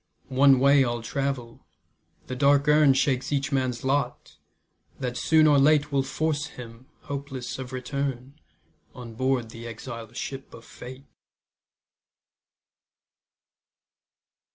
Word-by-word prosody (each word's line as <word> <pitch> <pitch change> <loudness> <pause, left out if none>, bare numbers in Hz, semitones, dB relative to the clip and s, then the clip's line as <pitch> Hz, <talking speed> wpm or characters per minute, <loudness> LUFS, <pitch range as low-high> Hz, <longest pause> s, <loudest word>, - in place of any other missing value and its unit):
One 135 0 +6
way 140 +1 +5
all 120 -2 -2
travel; 135 -2 -4 0.6
the 130 - -5
dark 140 +2 +3
urn 150 -2 +5
Shakes 130 0 0
each 140 0 -1
man's 130 -3 -1
lot, 130 -2 -2 0.6
that 125 -2 -3
soon 155 +4 +3
or 145 -2 +5
late 150 +1 +3
Will 140 -1 +2
force 150 +2 -2
him, 120 -2 -12
hopeless 135 -3 -6
of 130 -1 -7
return, 130 0 -4 0.6
On 120 -2 -9
board 130 -1 -1
the 115 +1 -9
exile 115 0 -8
ship 135 +2 -7
of 115 - -14
Fate. 130 +2 -11
135 Hz, 115 wpm, -26 LUFS, 125-140 Hz, 0.6 s, One